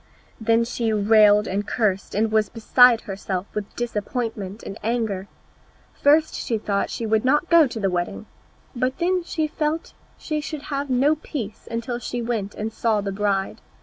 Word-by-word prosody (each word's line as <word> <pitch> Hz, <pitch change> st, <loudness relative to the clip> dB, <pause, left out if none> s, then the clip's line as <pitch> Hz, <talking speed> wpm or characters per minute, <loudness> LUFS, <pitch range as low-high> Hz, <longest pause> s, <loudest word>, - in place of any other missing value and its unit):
Then 230 Hz, +1 st, +3 dB
she 230 Hz, -1 st, -1 dB
railed 210 Hz, 0 st, +5 dB
and 200 Hz, +2 st, -2 dB
cursed, 195 Hz, -5 st, -1 dB
and 215 Hz, +1 st, +1 dB
was 215 Hz, -2 st, +2 dB
beside 235 Hz, +1 st, +5 dB
herself 195 Hz, -2 st, -4 dB
with 210 Hz, -1 st, -5 dB
disappointment 220 Hz, -3 st, -3 dB
and 195 Hz, -, -7 dB
anger. 220 Hz, -4 st, -1 dB, 0.7 s
First 305 Hz, +2 st, +3 dB
she 230 Hz, -, -2 dB
thought 200 Hz, -2 st, -1 dB
she 230 Hz, -, -4 dB
would 220 Hz, 0 st, +2 dB
not 295 Hz, +7 st, +2 dB
go 335 Hz, -3 st, +7 dB
to 240 Hz, -3 st, -6 dB
the 200 Hz, -, +1 dB
wedding; 175 Hz, -1 st, -3 dB, 0.5 s
but 255 Hz, +2 st, -1 dB
then 360 Hz, +1 st, +1 dB
she 320 Hz, -2 st, -1 dB
felt 305 Hz, +1 st, -2 dB, 0.2 s
she 305 Hz, -1 st, -3 dB
should 295 Hz, 0 st, -6 dB
have 280 Hz, 0 st, -2 dB
no 275 Hz, +5 st, +3 dB
peace 230 Hz, -8 st, -6 dB
until 235 Hz, +1 st, -3 dB
she 245 Hz, 0 st, -4 dB
went 230 Hz, -4 st, -3 dB
and 215 Hz, +1 st, -4 dB
saw 225 Hz, -2 st, +1 dB
the 200 Hz, 0 st, -3 dB
bride. 195 Hz, -1 st, -1 dB
225 Hz, 170 wpm, -23 LUFS, 205-255 Hz, 0.7 s, go